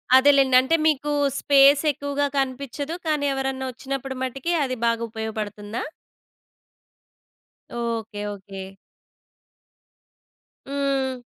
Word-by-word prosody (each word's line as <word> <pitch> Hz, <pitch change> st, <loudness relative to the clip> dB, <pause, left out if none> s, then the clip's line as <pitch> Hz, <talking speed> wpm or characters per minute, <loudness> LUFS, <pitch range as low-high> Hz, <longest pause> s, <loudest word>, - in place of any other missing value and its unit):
అదేలేండి. 270 Hz, -1 st, +5 dB
అంటే 295 Hz, +6 st, +2 dB
మీకు, 295 Hz, -1 st, +1 dB, 0.3 s
స్పేసెక్కువగా 285 Hz, 0 st, +4 dB
కనిపించదు. 275 Hz, +4 st, -2 dB
కానీ, 300 Hz, -2 st, +1 dB
ఎవరన్నా 265 Hz, 0 st, -2 dB
వచ్చినప్పుడు 265 Hz, +1 st, -5 dB
మటికి 270 Hz, +6 st, -3 dB
అది 255 Hz, -2 st, -2 dB
బాగా 230 Hz, 0 st, +1 dB
ఉపయోగపడుతుందా? 215 Hz, -1 st, -5 dB, 1.9 s
ఓకె. 230 Hz, -3 st, -3 dB
ఓకె. 195 Hz, -1 st, -9 dB, 2.0 s
హ్మ్. 275 Hz, -2 st, -1 dB
265 Hz, 80 wpm, -24 LUFS, 235-280 Hz, 2.0 s, అదేలేండి